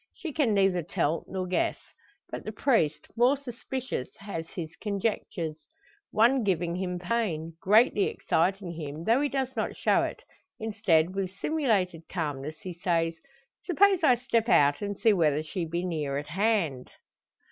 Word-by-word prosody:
She 335 -5 -6
can 260 -9 +2
neither 195 -3 +3
tell 165 -1 -1
nor 185 -1 -3
guess. 180 0 0 0.5
But - - -5
the 215 - -5
priest, 185 - +1
more 250 +4 +4
suspicious, 255 - -5
has 165 -5 -6
his 165 -3 -6
conjectures; 195 -6 -2 0.5
one 240 +3 +4
giving 175 -4 0
him 180 -1 -2
pain 175 -5 -2
greatly 210 +1 +4
exciting 185 +2 0
him, 155 -1 -6
though 230 +8 +3
he 290 - +1
does 265 -1 -2
not 220 - -2
show - - +3
it. - - -4 0.4
Instead, 200 -7 +2
with 195 -1 -2
simulated 200 - -1
calmness, 150 -3 -3
he 185 - -6
says: 165 -1 0 0.5
"Suppose 385 0 +3
I 255 -5 +6
step 235 -2 0
out 145 -7 +4
and 205 -1 -3
see 225 -2 +4
whether 155 -5 +2
she 170 +3 -3
be 170 +2 -2
near 150 -6 -2
at 145 +1 -5
hand?" 175 - 0
190 Hz, 155 wpm, -28 LUFS, 165-230 Hz, 0.5 s, I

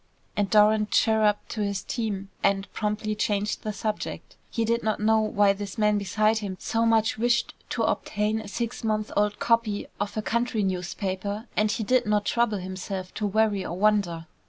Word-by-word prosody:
And 205 -1 0
Doran 210 0 +5
chirrupped 215 -1 +2
to 215 - -3
his 200 -1 -1
team 205 -5 -3
and 195 0 +1
promptly 210 0 -1
changed 210 0 -1
the 215 - -3
subject. 210 +1 -4
He 230 - -1
did 235 +1 +1
not 215 -1 -1
know 220 +1 +4
why 205 -2 +3
this 200 +2 -7
man 210 -1 +3
beside 215 +2 +1
him 195 -3 -5
so 230 0 0
much 225 -1 +2
wished 240 0 +2 0.2
to - - -1
obtain 215 +1 0
a 215 - -9
six 235 +4 -4
months 215 -1 -1
old 210 0 +1
copy 230 -3 +1
of 205 +1 -3
a 215 - -1
country 235 -2 0
newspaper, 190 +3 -3
and 215 0 +2
he 220 - -1
did 250 +1 +2
not 210 -1 +2
trouble 235 -3 +1
himself 185 0 -5
to 210 - -1
worry 210 -1 +2
or 175 - -5
wonder. 195 -5 +2
210 Hz, 180 wpm, -26 LUFS, 200-220 Hz, 0.2 s, Doran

